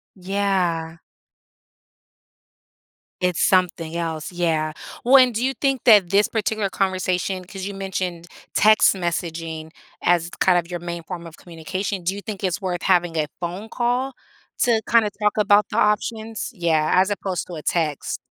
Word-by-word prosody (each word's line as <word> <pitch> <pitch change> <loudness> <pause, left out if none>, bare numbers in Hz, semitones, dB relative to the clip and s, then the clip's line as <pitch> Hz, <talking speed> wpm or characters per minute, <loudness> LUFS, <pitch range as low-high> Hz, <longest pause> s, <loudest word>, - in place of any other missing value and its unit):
Yeah. 180 -4 -1 2.2
It's 180 -2 +1
something 170 -3 +1
else, 160 -2 -3
yeah, 165 -3 0 0.3
well 260 +3 +7
and 255 -3 +5
do 235 - -1
you 265 - +1
think 270 -2 +1
that 205 -7 +6
this 205 +1 +4
particular 215 -2 -1
conversation 185 -1 -1
'cause 190 +1 -7
you 200 - -5
mentioned 185 -3 -4 0.3
text 215 0 +5
messaging 165 -3 -4 0.3
as 175 -1 +2
kind 185 -1 +4
of 175 0 -1
your 175 - -3
main 170 0 -6
form 170 0 -7
of 165 0 -11
communication, 185 +3 -5
do 185 +3 0
you 200 - -6
think 200 -3 -6
it's 185 +2 -1
worth 180 -2 -2
having 175 -3 +2
a 155 - +1
phone 180 +5 -5
call 250 +2 0 0.5
to 235 -3 +3
kinda 230 -2 +4
talk 210 0 +3
about 205 -1 +4
the - - -3
options? 220 +1 0
Yeah, 165 -5 +1
as 190 +2 +4
opposed 190 -3 -3
to 180 - -7
a 155 - -7
text. 155 -4 -1
185 Hz, 155 wpm, -22 LUFS, 170-210 Hz, 2.2 s, well